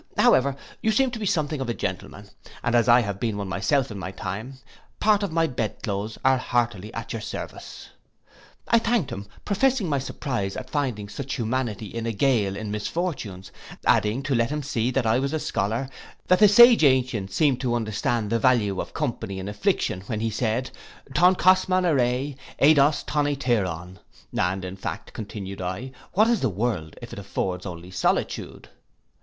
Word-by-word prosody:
However 135 +1 +4 0.3
you 220 - +2
seem 260 +4 +2
to 235 - -5
be 210 - -2
something 155 -4 0
of 130 - -3
a 120 - -1
gentleman, - - -5 0.4
and 120 - 0
as 120 0 +4
I 120 +1 +7
have 100 -3 -4
been 110 -2 -1
one 100 -1 -3
myself 100 +8 0
in 100 - -6
my 95 - -4
time, 105 +7 -6 0.4
part 215 -1 +4
of 200 -4 -2
my 165 0 +2
bed 125 -7 -3
cloaths 105 +1 -3
are 130 -1 +5
heartily 120 -5 -1
at 115 - -5
your 115 - -4
service.' - - -7 0.8
I 230 - +5
thanked 225 - 0
him, 100 +1 -6 0.2
professing 230 +1 +2
my 145 -3 +1
surprize 125 -7 -3
at 130 - -7
finding 125 -9 -1
such 135 +6 -5
humanity 115 -3 -2
in 115 +2 -5
a 115 - -1
gaol 105 -4 +2
in 105 0 -5
misfortunes; 105 - -4 0.3
adding, 110 +6 +2
to 135 0 -1
let 115 -1 +2
him 150 0 -3
see 125 -3 -1
that 130 -1 0
I 110 +2 +3
was 140 +2 -1
a 155 - 0
scholar, 115 +2 -1 0.4
'That 185 - +4
the 210 - +8
sage 235 0 +8
ancient 125 -8 +2
seemed 135 +3 +2
to 120 -3 0
understand 115 0 -1
the 115 - +2
value 110 -6 +2
of - - -9
company 115 -9 -3
in 95 +1 -5
affliction, 105 -2 0
when 110 -3 -2
he 115 0 0
said, 115 +3 -1 0.4
Ton 180 +5 +5
kosman 185 0 +4
aire, 135 -2 +1 0.2
ei 150 +3 +6
dos 145 0 +3
ton 150 -1 0
etairon; 95 - -1 0.4
and 95 +1 0
in 95 +1 -7
fact,' - - -6
continued 100 -3 -6
I, 95 +9 -4 0.2
'what 215 +4 +4
is 235 -2 +2
the 130 - +2
World 95 -6 -2
if - - -8
it - - -6
affords 95 -2 -3
only 90 0 -8
solitude? 90 - -1
120 Hz, 185 wpm, -25 LUFS, 105-145 Hz, 0.8 s, the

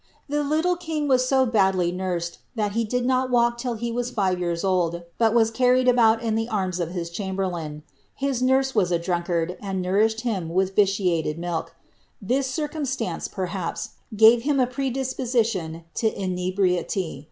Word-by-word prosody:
The 295 +1 0
little 315 +5 +1
king 320 -4 -3
was 255 -2 +3
so 265 0 +3
badly 190 -6 +2
nursed, 175 -2 -3 0.2
that 210 -3 0
he 230 +3 0
did 245 +3 -1
not 255 0 +1
walk 240 -1 +2
till 245 -1 -2
he 235 +1 -3
was 245 +1 -2
Ave 185 -3 +1
years 170 -1 -2
old, 175 -3 0 0.2
but 225 -1 +4
was 225 -1 +4
carried 255 +2 +3
about 230 -2 +4
in 225 -1 0
tlie 225 0 -1
arms 185 -4 -1
of 170 -2 -1
his 170 -1 -5
chamberlain. 175 -6 -4 0.3
His 270 -2 -1
nurse 265 +1 +2
was 185 -5 +2
a 170 - +3
drunkard, 175 0 -1
and 195 -2 -3
nourished 210 +5 +1
him 200 -9 -2
with 190 +2 0
vitiated 180 -6 +1
milk. 170 -1 -4 0.4
This 260 +6 0
circumstance, 265 - -3
perhaps, 185 -2 -4 0.3
gave 225 +2 +7
him 280 +2 +1
a 255 - +4
predisposition 245 - -1
to 220 -1 +1
inebriety. 185 -3 -1
210 Hz, 165 wpm, -24 LUFS, 180-250 Hz, 0.4 s, gave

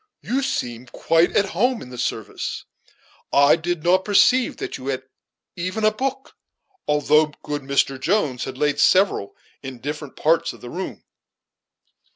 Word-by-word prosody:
You 265 +3 0
seem 125 - -3
quite 165 +7 +2
at 200 -1 +2
home 245 +7 +1
in 125 - -11
the 125 - -8
service; 110 -2 -4 0.7
I 140 +1 +6
did 170 -1 -3
not 185 +2 +3
perceive 245 +5 +3
that - - -5
you 130 - -8
had 130 -1 -2 0.5
even 185 +5 -3
a 215 - +5
book, 265 +4 -4 0.5
although 150 +1 +3 0.2
good 145 0 -3
Mr. 135 0 0
Jones, 145 - 0
had 130 - -7
laid 145 0 0
several 185 - +3 0.3
in 135 -2 -7
different 150 +1 -6
parts 165 +2 +1
of - - -16
the 120 - -9
room." 185 +2 -6
155 Hz, 155 wpm, -22 LUFS, 135-195 Hz, 0.7 s, I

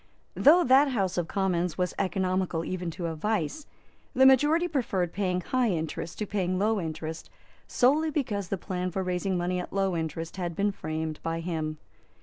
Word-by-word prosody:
Though 340 +5 +6
that 270 +3 +6
House 200 -9 0
of 170 - -2
Commons 180 -4 0
was 180 -1 0
economical 185 -3 0
even 180 -2 -3
to 170 +1 -5
a 165 - -2
vice, 210 - -2 0.5
the 265 +1 +6
majority 295 +6 +5
preferred 200 - -1
paying 180 -2 0
high 250 +5 +1
interest 165 -1 -3
to 210 - -2
paying 185 -3 -1
low 215 +2 +1
interest, 160 0 -5 0.4
solely 295 +6 +3
because 220 - -2
the 195 - -2
plan 185 0 -3
for 190 +2 -2
raising 180 +1 -1
money 180 +1 -1
at 180 - -6
low 195 -2 0
interest 165 +1 -4
had 175 -3 -3
been 205 +3 +1
framed 155 -3 -4
by 165 0 -2
him. 160 -2 -3
185 Hz, 175 wpm, -28 LUFS, 170-210 Hz, 0.5 s, Though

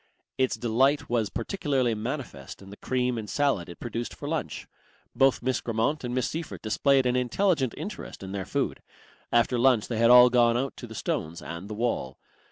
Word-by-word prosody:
Its 130 -1 +1
delight 130 +4 +1
was 115 -4 +1
particularly 140 - -1
manifest 120 -1 -6
in 95 - -12
the 100 - -11
cream 125 -2 -1
and 105 - -7
salad 135 -12 0
it 85 - -10
produced 120 0 -5
for - - -7
lunch. - - -3 0.5
Both 135 -2 +3
Miss 130 0 0
Grammont 115 +6 -1
and 125 0 -3
Miss 130 -2 +1
Seyffert 165 0 -6
displayed 135 +5 +2
an 125 0 +2
intelligent 130 - +1
interest 205 - -7
in 95 - -7
their 100 -1 -3
food. - - -2 0.5
After 120 +1 +2
lunch 120 -3 +3
they 115 -3 -2
had 115 0 +5
all 125 0 +9
gone 120 -1 +4
out 135 +2 -2
to 120 - -8
the 110 - -10
stones 80 -4 -3
and 85 +4 -8
the 105 - -5
wall. 105 - -2
120 Hz, 190 wpm, -27 LUFS, 110-130 Hz, 0.5 s, all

